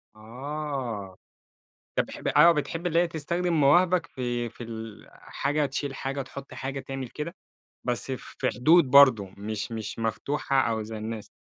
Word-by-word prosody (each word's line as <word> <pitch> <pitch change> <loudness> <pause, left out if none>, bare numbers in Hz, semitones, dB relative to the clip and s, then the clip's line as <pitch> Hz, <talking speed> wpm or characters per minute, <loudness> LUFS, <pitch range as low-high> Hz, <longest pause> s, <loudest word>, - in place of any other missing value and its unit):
آه، 125 -4 -5 0.8
طَب - - +2
بح - - -3
آه، 170 +3 +9
بتحب 165 +3 -2
اللي 165 0 +3
هي 175 - +3
تستخدم 170 +2 -2
مواهبك 170 +4 +4
في 120 -2 -3
في 120 - -10
ال 110 -2 -8
حاجة 145 +1 -1
تشيل 135 0 -3
حاجة، 135 +1 -3
تحط 135 0 -9
حاجة، 135 +2 -4
تعمل 135 -2 -5
كده؟ 170 +5 -6 0.5
بس 125 +2 -2
في 130 - -3
حدود 150 +2 +5
برضه 130 -7 +7
مش 105 +2 -4
مش 110 -1 -5
مفتوحة 135 +4 0
أو 115 -3 0
زي 110 +1 -7
الناس 110 0 -6
135 Hz, 150 wpm, -27 LUFS, 115-150 Hz, 0.8 s, آه